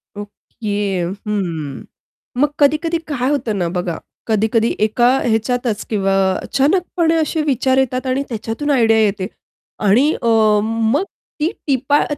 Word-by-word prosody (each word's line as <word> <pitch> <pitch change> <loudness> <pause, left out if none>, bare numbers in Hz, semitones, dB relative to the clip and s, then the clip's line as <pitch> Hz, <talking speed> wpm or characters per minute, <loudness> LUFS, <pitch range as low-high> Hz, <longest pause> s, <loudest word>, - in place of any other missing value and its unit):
Okay, 205 -2 -4 0.3
हं. 165 -9 -3 0.5
मग 290 +2 +3
कधी-कधी 310 +4 +2
काय 260 -1 0
होतं 250 -7 -1
ना 175 -3 0
बघा 175 -2 -2 0.3
कधी-कधी 220 +1 +1
एका 240 +3 +3 0.2
ह्याच्यातच 230 0 0
किंवा 195 -3 0 0.3
अचानकपणे 330 +3 +1
असे 320 0 0
विचार 265 -3 +1
येतात 260 0 0
आणि 260 +2 0
त्याच्यातून 225 +5 -4
आयडिया 225 -5 +4
येते 200 -3 +1 0.6
आणि 245 +10 +4
अ, 235 - -1 0.4
मग 225 - +1 0.4
ती 315 +5 +1 0.2
टिपा 275 +2 +2
235 Hz, 125 wpm, -18 LUFS, 210-280 Hz, 0.6 s, आयडिया